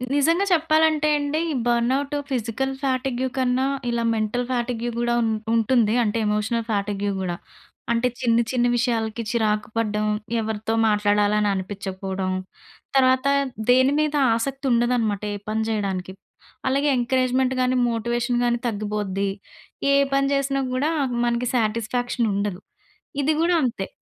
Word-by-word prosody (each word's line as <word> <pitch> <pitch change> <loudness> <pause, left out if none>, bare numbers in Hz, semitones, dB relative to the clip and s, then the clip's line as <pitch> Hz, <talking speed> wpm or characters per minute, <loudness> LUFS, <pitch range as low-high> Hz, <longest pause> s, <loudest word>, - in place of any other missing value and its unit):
నిజంగా 330 +7 +3
చెప్పాలంటే 315 -2 +3
అండి. 290 +1 -1
ఈ - - -1
బర్న్అవుట్ 250 +4 +1 0.2
ఫిజికల్ 260 +1 -2
ఫ్యాటిగ్యూ 260 -1 0
కన్నా 255 0 +1 0.2
ఇలా 235 0 0
మెంటల్ 220 +3 -1
ఫ్యాటిగ్యూ 240 -1 -1
గూడా 240 0 +1
ఉం 225 - +1 0.3
ఉంటుంది 225 -1 +3
అంటే 215 0 -1
ఎమోషనల్ 215 +2 0
ఫ్యాటిగ్యూ 205 -1 -1
గూడా. 180 -2 -2 0.6
అంటే 235 +2 +2
చిన్న, 235 -2 +2
చిన్న 245 -2 +1
విషయాలకి 230 -1 -1
చిరాకు 215 -2 0
పడడం, 215 -2 0 0.4
ఎవరితో 220 0 -3
మాట్లాడాలని 210 0 +2
అనిపించకపోవడం, 190 0 -4 0.6
తర్వాత 260 0 +4 0.4
దేని 260 +2 +5
మీద 305 -1 0 0.2
ఆసక్తి 270 +4 -3
ఉండదనమాట 235 -4 +1
ఏ - - -3
పని 220 +1 0
చేయడానికి. 195 -4 -2 0.6
అలాగే 275 +3 +1
ఎంకరేజ్‌మెంట్ 255 +1 +1
గానీ, 255 0 +2 0.2
మోటివేషన్ 240 +2 -1
గానీ 240 0 +2
తగ్గిపోద్ది. 205 -2 -2 0.6
ఏ - - +5 0.2
పని 275 0 +2
చేసినా 275 0 0
గూడా 275 +4 +1 0.4
మనకి 240 +1 0
సాటిస్‌ఫాక్షన్ 230 +1 0
ఉండదు. 200 -2 -2 0.6
ఇది 300 +3 +2
గూడా 350 +1 +3
అంతే. 230 -6 -2
235 Hz, 125 wpm, -23 LUFS, 210-260 Hz, 0.6 s, దేని